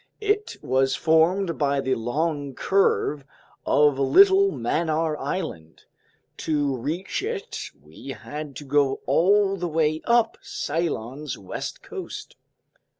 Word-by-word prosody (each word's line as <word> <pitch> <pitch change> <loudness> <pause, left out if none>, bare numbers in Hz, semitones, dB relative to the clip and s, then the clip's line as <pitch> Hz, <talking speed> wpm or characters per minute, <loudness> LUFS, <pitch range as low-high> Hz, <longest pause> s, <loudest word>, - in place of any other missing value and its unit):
It 420 0 0
was 130 +1 +2
formed 165 +3 +2
by 140 -1 +1
the 130 -1 0
long 140 +4 -2
curve 170 -6 +1 0.4
of 145 -2 +4
little 390 - +6
Mannar 160 -1 0
Island. 90 - -5 0.5
To 145 -4 0
reach 160 +10 -3
it 430 0 -5
we - - -15
had 150 -2 -7
to 145 - -7
go 140 -1 +1
all 195 +2 +3
the 175 -1 -2
way 155 -1 +1
up 235 -1 +2
Ceylon's 145 -3 -3
west 95 - -6
coast. - - -8
155 Hz, 115 wpm, -24 LUFS, 140-185 Hz, 0.5 s, little